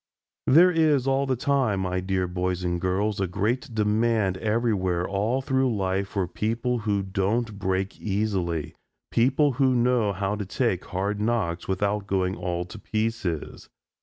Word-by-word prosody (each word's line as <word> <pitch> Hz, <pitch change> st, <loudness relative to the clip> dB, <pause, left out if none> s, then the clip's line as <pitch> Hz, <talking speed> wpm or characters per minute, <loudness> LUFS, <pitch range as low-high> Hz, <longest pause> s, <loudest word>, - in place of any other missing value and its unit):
There 170 Hz, +7 st, +7 dB
is 155 Hz, -6 st, +3 dB
all 135 Hz, +1 st, +1 dB
the 130 Hz, -, +1 dB
time, 125 Hz, -6 st, +1 dB
my 90 Hz, 0 st, -1 dB
dear 95 Hz, 0 st, -1 dB
boys 90 Hz, 0 st, -2 dB
and 85 Hz, -1 st, -1 dB
girls, 100 Hz, +2 st, 0 dB
a 95 Hz, -, +1 dB
great 105 Hz, +8 st, -1 dB
demand 105 Hz, -2 st, +2 dB
everywhere 105 Hz, -5 st, 0 dB
all 110 Hz, +7 st, 0 dB
through 130 Hz, -3 st, +1 dB
life 95 Hz, 0 st, -1 dB
for 95 Hz, -2 st, -2 dB
people 115 Hz, +6 st, -1 dB
who 105 Hz, -2 st, 0 dB
don't 100 Hz, +3 st, -1 dB
break 95 Hz, 0 st, -1 dB
easily 95 Hz, -6 st, -1 dB, 0.4 s
people 135 Hz, +5 st, +3 dB
who 130 Hz, 0 st, +2 dB
know 120 Hz, -3 st, +2 dB
how 100 Hz, +1 st, -2 dB
to 105 Hz, -, -3 dB
take 100 Hz, -3 st, -1 dB
hard 100 Hz, +2 st, -2 dB
knocks 105 Hz, -7 st, -1 dB
without 100 Hz, +1 st, -1 dB
going 95 Hz, -1 st, 0 dB
all 90 Hz, -1 st, -3 dB
to 100 Hz, +5 st, -10 dB
pieces. 110 Hz, -8 st, -3 dB
105 Hz, 155 wpm, -25 LUFS, 95-120 Hz, 0.4 s, There